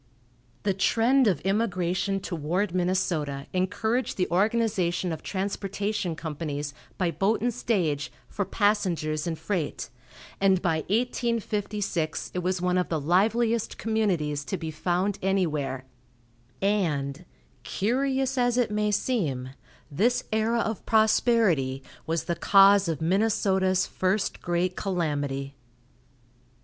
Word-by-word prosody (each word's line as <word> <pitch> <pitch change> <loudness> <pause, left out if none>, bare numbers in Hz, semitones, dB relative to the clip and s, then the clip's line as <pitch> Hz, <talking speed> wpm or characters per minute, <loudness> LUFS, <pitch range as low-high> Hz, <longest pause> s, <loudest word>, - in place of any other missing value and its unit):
The 200 - +1
trend 230 +7 +3
of 175 -8 +1
immigration 195 -2 0
toward 175 +2 -2
Minnesota 175 -6 -1
encouraged 220 +6 0
the 180 - +1
organization 190 -3 +1
of 160 - -5
transportation 200 -1 -2
companies, 150 -2 -4 0.2
by 180 -3 +1
boat 195 +8 +1
and 240 +1 0
stage, 165 -12 -1 0.2
for 205 - -2
passengers 185 -7 0
and 165 -1 -2
freight, 170 - -3 0.5
and 195 -1 +4
by 170 -3 +1
1856 210 - -1
it 180 - -1
was 180 +1 -1
one 180 0 +1
of 180 - -1
the 160 - 0
liveliest 220 +8 +1
communities 180 -10 0
to 190 - -3
be 160 -1 -5
found 180 +5 -1
anywhere, 155 -9 -1 0.8
and, 165 -7 0 0.4
curious 265 +4 0
as 245 0 +2
it 240 -4 +2
may 210 0 +1
seem, 155 - -1 0.4
this 230 - +2
era 225 +2 +2
of 220 -1 -3
prosperity 215 - +3 0.2
was 165 0 0
the 170 - -2
cause 195 +2 +6
of 160 -3 -2
Minnesota's 190 0 +2
first 190 +2 -1
great 175 +1 0
calamity. 145 -7 -2
190 Hz, 115 wpm, -26 LUFS, 165-215 Hz, 0.8 s, cause